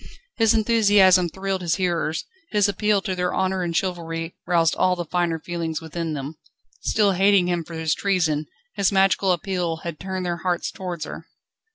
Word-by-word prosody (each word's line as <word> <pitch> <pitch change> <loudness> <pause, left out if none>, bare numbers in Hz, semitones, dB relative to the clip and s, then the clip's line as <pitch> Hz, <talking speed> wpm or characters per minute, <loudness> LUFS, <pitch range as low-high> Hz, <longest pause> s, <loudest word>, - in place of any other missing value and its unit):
His 225 -1 +4
enthusiasm 205 -5 +4
thrilled 190 +1 -3
his 170 -2 0
hearers, 175 -4 -1 0.2
his 210 -1 +3
appeal 205 0 +1
to 190 - -2
their 180 0 -1
honour 190 0 0
and 170 -1 -1
chivalry 165 -3 -3
roused 165 -2 +3
all 185 0 +2
the 175 -1 -4
finer 170 0 0
feelings 165 -1 -4
within 165 0 -4
them. 145 +2 -6 0.4
Still 210 -2 +2
hating 195 0 +4
him 175 -1 0
for 165 +1 -10
his 160 -1 0
treason, 160 -6 0 0.3
his 200 -1 +1
magical 195 0 +3
appeal 175 -1 -1
had 170 -3 -5
turned 190 -1 -4
their 175 -1 -1
hearts 175 0 -2
towards 175 -4 -5
her. - - -9
180 Hz, 175 wpm, -23 LUFS, 165-195 Hz, 0.4 s, His